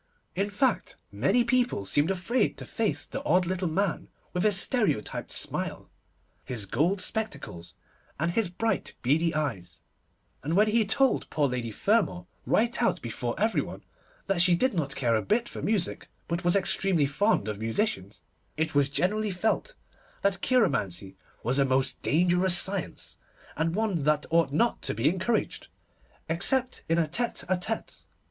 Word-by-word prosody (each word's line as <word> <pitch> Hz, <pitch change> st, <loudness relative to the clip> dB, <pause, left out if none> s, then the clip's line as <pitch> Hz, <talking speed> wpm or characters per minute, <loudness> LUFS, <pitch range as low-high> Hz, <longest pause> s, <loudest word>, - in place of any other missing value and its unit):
In 200 Hz, +3 st, 0 dB
fact, 240 Hz, +4 st, 0 dB, 0.2 s
many 165 Hz, -, +2 dB
people 240 Hz, -, +1 dB
seemed 145 Hz, -, +2 dB
afraid 200 Hz, +5 st, 0 dB
to -, -, -7 dB
face 225 Hz, -3 st, +1 dB
the 275 Hz, -, -6 dB
odd 185 Hz, -10 st, +3 dB
little 185 Hz, +1 st, -1 dB
man 185 Hz, +3 st, -1 dB, 0.3 s
with 180 Hz, -, -1 dB
his 205 Hz, -1 st, +3 dB
stereotyped 215 Hz, -, 0 dB
smile, -, -, -3 dB, 0.5 s
his 120 Hz, -6 st, -4 dB
gold 155 Hz, -, +1 dB
spectacles, 140 Hz, -, -5 dB, 0.4 s
and 170 Hz, +3 st, +1 dB
his 220 Hz, 0 st, 0 dB
bright, 225 Hz, +6 st, -2 dB
beady 160 Hz, +7 st, +2 dB
eyes; 95 Hz, -, -3 dB, 0.6 s
and 155 Hz, +5 st, -2 dB
when 210 Hz, +2 st, +4 dB
he 225 Hz, 0 st, +3 dB
told 265 Hz, +6 st, +2 dB
poor 145 Hz, -2 st, +1 dB
Lady 125 Hz, -3 st, -3 dB
Fermor, 190 Hz, -, +1 dB, 0.2 s
right 235 Hz, +2 st, +2 dB
out 230 Hz, -, +2 dB
before 120 Hz, +1 st, -3 dB
every 220 Hz, +2 st, +2 dB
one, -, -, -8 dB, 0.4 s
that 195 Hz, -3 st, +1 dB
she 180 Hz, -1 st, +5 dB
did 260 Hz, +8 st, +1 dB
not 140 Hz, -6 st, -2 dB
care 120 Hz, -4 st, +1 dB
a 110 Hz, -, +1 dB
bit 235 Hz, -, 0 dB
for -, -, -7 dB
music, 200 Hz, -4 st, -1 dB, 0.2 s
but 170 Hz, +2 st, -2 dB
was 175 Hz, +1 st, +3 dB
extremely 190 Hz, -4 st, +2 dB
fond 150 Hz, -, +1 dB
of 105 Hz, -1 st, -4 dB
musicians, 110 Hz, -, -2 dB, 0.3 s
it 160 Hz, +1 st, -1 dB
was 145 Hz, -1 st, +3 dB
generally 210 Hz, +8 st, 0 dB
felt 220 Hz, -, -1 dB, 0.5 s
that 200 Hz, -1 st, +1 dB
cheiromancy 100 Hz, -, +1 dB, 0.3 s
was 130 Hz, +4 st, +2 dB
a -, -, +5 dB
most 130 Hz, 0 st, 0 dB
dangerous 180 Hz, +2 st, +3 dB
science, 190 Hz, -1 st, -2 dB, 0.4 s
and 165 Hz, +2 st, -1 dB
one 210 Hz, -6 st, 0 dB
that 150 Hz, +1 st, +1 dB
ought 165 Hz, -3 st, +3 dB
not 230 Hz, +11 st, +1 dB
to -, -, -3 dB
be 115 Hz, +5 st, +1 dB
encouraged, 190 Hz, +7 st, -1 dB, 0.6 s
except 245 Hz, +11 st, +1 dB
in 165 Hz, -, +3 dB
a 165 Hz, -2 st, +2 dB
tête 235 Hz, +10 st, -2 dB
à 180 Hz, 0 st, 0 dB
tête. 220 Hz, +4 st, -5 dB
180 Hz, 160 wpm, -27 LUFS, 140-215 Hz, 0.6 s, she